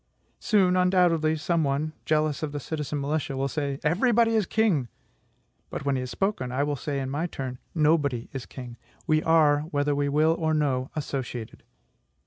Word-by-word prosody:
Soon, 190 -4 +3
undoubtedly, 180 -4 +3
some 165 +1 0
one, 145 +2 -1
jealous 155 -2 +1
of 155 -2 -3
the 145 - -3
citizen 150 0 -4
militia, 140 -1 -2
will 135 +1 0
say, 140 -1 -3
"Everybody 225 - +3
is 215 -5 +2
king." 195 - +2 0.8
But, - - -6
when 140 -1 +1
he - - -1
has 125 0 -4
spoken, 130 - -1
I 130 +3 0
will 145 0 -1
say, 140 +1 -3
in 135 -1 -3
my 155 +5 -1
turn, 130 -5 -6 0.2
"Nobody 150 -6 +2
is 135 -2 -6
king; 125 -2 -9 0.3
we 155 0 +2
are, 155 -3 +4
whether 145 -2 +1
we 145 0 0
will 155 +3 +3
or 160 -1 +1
no, 135 -4 0
associated." 130 -6 -5
150 Hz, 175 wpm, -26 LUFS, 135-160 Hz, 0.8 s, are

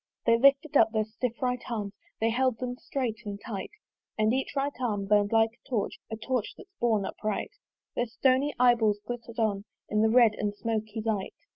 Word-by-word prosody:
They 230 - +5
lifted 275 +4 +4
up 225 -4 +6
their 220 -1 +1
stiff 230 +2 -4
right 250 -1 0
arms, 210 -4 -3 0.3
They 225 +1 +2
held 255 0 +1
them 250 0 -4
strait 250 -3 -3
and 205 -2 -6
tight; 205 -3 -5 0.5
And 215 +1 +3
each 265 +2 -2
right 280 +1 0
arm 210 -5 -1
burnt 205 0 +3
like 225 0 +4
a - - -23
torch, 230 -6 -1
A 220 - -4
torch 235 0 -2
that's 390 -1 -15
borne 220 -4 +2
upright. 215 +1 -3 0.4
Their 240 - 0
stony 260 +5 +2
eye 245 0 +6
balls 215 -3 +1
glitter'd 235 -1 -6
on 210 -3 0 0.2
In 210 0 +2
the 220 - +4
red 230 -2 +6
and 205 -1 -1
smoky 220 0 -3
light. 210 -4 -1
225 Hz, 195 wpm, -28 LUFS, 215-250 Hz, 0.5 s, up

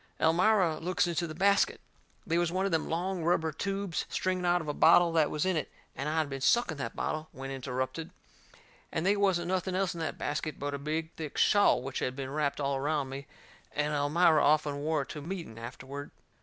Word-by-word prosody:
Elmira 175 0 +3
looks 180 +2 +1
into 170 0 -1
the 155 - -7
basket. 200 +3 +3 0.5
They 170 -3 +1
was 175 -1 +1
one 190 +2 0
of 195 - 0
them 160 -1 0
long 175 +2 -2
rubber 160 -1 +2
tubes 195 +2 -3
stringing 185 -1 -1
out 175 0 +4
of 160 - -7
a 150 - -1
bottle 170 +3 +6
that 160 -2 +3
was 150 - -1
in 185 -1 +1
it, 155 - -2 0.2
and 140 +3 -3
I 160 - -1
had 155 -2 +2
been 135 -1 -6
sucking 180 - +2
that 115 -5 -4
bottle 155 0 -3
when 135 +1 -7
interrupted. 130 +4 -3 0.8
And 160 - -2
they 200 +2 +4
wasn't 190 -4 +1
nothing 185 0 -1
else 190 -1 0
in 170 - -7
that 160 - -3
basket 150 +1 -3
but 145 0 -3
a 140 - -3
big 155 +3 -3
thick 155 -3 -6
shawl 205 -11 +4
which 135 0 -4
had 125 - -2
been 135 -1 -5
wrapped 150 -1 -1
all 140 -1 0
around 145 0 -1
me, 140 +2 -7 0.5
and 150 0 0
Elmira 155 +3 +4
often 145 -1 +2
wore 155 0 0
it - - -15
to 150 - -6
meeting 165 - -6
afterward. 130 +4 -7
160 Hz, 215 wpm, -30 LUFS, 145-175 Hz, 0.8 s, bottle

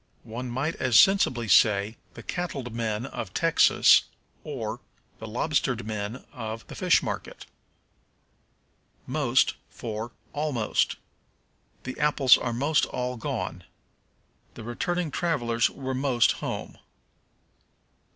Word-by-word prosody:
One 120 +3 -6
might 135 +7 -1
as 125 -4 +4
sensibly 130 - +4
say, 105 0 +4 0.2
"The - - -10
cattled 140 -9 -4
men 115 0 -2
of 110 -7 -7
Texas," 165 0 +5 0.4
or, - - -5 0.4
"The 110 - -7
lobstered 125 0 -1
men 110 +3 -5
of 115 -3 -6
the - - -11
fish - - +3
market." - - -5 1.6
Most - - +2 0.2
for 115 0 -6 0.2
Almost. 145 -7 0 0.9
"The 130 - -6
apples 145 -3 +5
are 120 - -2
most 140 +6 +1
all 125 0 -3
gone." 115 - -4 0.9
"The 115 - -9
returning 165 +8 -2
travelers 120 -9 +1
were 130 -1 -5
most 130 -3 +3
home." - - -5
125 Hz, 110 wpm, -26 LUFS, 115-145 Hz, 1.6 s, Texas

